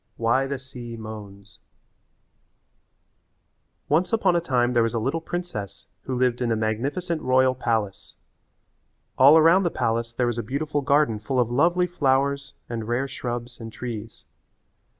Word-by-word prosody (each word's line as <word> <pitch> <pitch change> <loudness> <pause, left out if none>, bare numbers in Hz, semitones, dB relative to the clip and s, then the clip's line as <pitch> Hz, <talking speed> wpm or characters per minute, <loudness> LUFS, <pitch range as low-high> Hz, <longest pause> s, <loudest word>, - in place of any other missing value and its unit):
XVII - - -47
Why 130 +4 +2
the 140 0 -3
Sea 125 -3 -9
Moans 105 -2 -10 2.3
Once 160 +6 +2
upon 195 -6 +2
a 170 - +2
time 125 -5 +1
there 120 - +4
was 115 +1 0
a - - +1
little 135 +9 -1
princess 160 - -5 0.2
who 130 -1 -2
lived 125 -1 +1
in 120 -1 0
a - - +2
magnificent 140 +11 -2
royal 130 0 +3
palace. 110 -5 -2 1.0
All 140 +4 +8
around 165 +4 +6
the 175 - +1
palace 115 -4 -1
there 120 +1 -1
was 120 -1 -1
a - - 0
beautiful 145 +6 -2
garden 140 -5 +2
full 125 +5 -1
of 120 -1 +1
lovely 175 +7 +3
flowers 140 -4 0
and 115 -2 -5
rare 120 +3 0
shrubs 120 -2 -5
and 115 -1 -8
trees. 115 -2 -7
125 Hz, 155 wpm, -24 LUFS, 115-145 Hz, 2.3 s, All